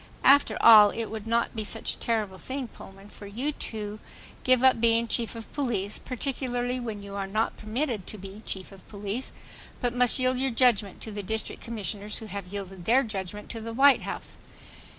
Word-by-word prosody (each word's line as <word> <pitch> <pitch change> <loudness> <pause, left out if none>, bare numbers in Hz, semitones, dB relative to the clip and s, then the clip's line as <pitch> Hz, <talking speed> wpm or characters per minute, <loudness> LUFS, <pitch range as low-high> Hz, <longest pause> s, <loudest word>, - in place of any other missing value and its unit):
After 280 +2 +6
all 215 -3 +10
it 225 0 -4
would 220 -1 -6
not 235 +1 +1
be 220 - -2
such - - -1
a - - -9
terrible 210 -5 -1
thing, 260 -2 -5
Pullman, 195 0 -13
for 205 - -11
you 245 +9 -2
to 215 -6 -4 0.4
give 255 -1 +4
up 260 -3 +5
being 230 0 +3
Chief 230 0 0
of 225 -1 -9
Police, 220 -8 -1
particularly 250 -1 -2
when 220 -4 -5
you 200 0 -9
are 200 -1 -3
not 215 +3 0
permitted 225 -2 -2
to 215 - -6
be 195 +2 -9
chief 190 0 -4
of 195 -1 -15
police, 205 +4 -4 0.5
but 245 -1 0
must 245 -1 +4
yield 255 -1 +1
your 270 0 +1
judgment 230 -5 +2
to 220 - -6
the 205 0 -4
district 220 +3 -4
commissioners 210 -2 -3
who 220 - -7
have 200 -2 -6
yielded 195 -3 -7
their 255 +4 +4
judgment 205 -1 -5
to 225 - -6
the 225 +1 -5
White 275 +2 +6
House. - - -5
220 Hz, 195 wpm, -27 LUFS, 205-245 Hz, 0.5 s, all